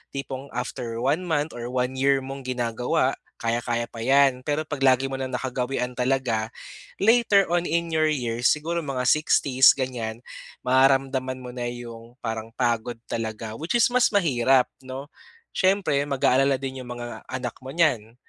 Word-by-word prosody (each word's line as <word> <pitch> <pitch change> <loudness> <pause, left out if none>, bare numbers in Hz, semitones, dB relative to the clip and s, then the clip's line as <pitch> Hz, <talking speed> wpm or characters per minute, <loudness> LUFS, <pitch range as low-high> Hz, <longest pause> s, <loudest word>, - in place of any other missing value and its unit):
Tipong 135 0 -5
after 120 -2 -4
1 145 +7 +2
month 155 -1 0
or 120 0 -5
1 125 0 -1
year 135 0 +3
mong 135 0 -7
ginagawa, 125 -1 0 0.3
kaya-kaya 120 0 -1
pa 115 - -9
'yan. 135 -1 +4
Pero 150 +1 0
'pag 145 - -4
lagi 130 0 +4
mo - - -2
ng 130 0 -3
nakagawian 125 0 -2
talaga, 125 -4 0 0.6
later 225 -3 +5
on 175 0 +2
in 170 +1 0
your 155 0 +2
years 120 -4 0
siguro 165 +3 -1
mga 130 -3 -2
60s 135 -3 +5
ganyan, 120 -4 -3 0.4
mararamdaman 130 0 +2
mo 125 - -7
na' 120 -1 -3
'yong 120 -1 -10
parang 110 0 -4
pagod 120 -1 -1
talaga. 110 -1 -4
Which 165 +9 -2
is - - +6
mas 250 0 +4
mahirap, 130 -8 +3 0.2
'no, 130 +2 -7 0.5
siyempre 190 -7 +2
mag-aalala 135 0 +3
din 135 -1 -5
'yong 120 - -9
mga 120 0 -7
anak 125 -2 -4
mo 130 - -7
niyan. 120 -10 +1
130 Hz, 155 wpm, -25 LUFS, 120-140 Hz, 0.6 s, is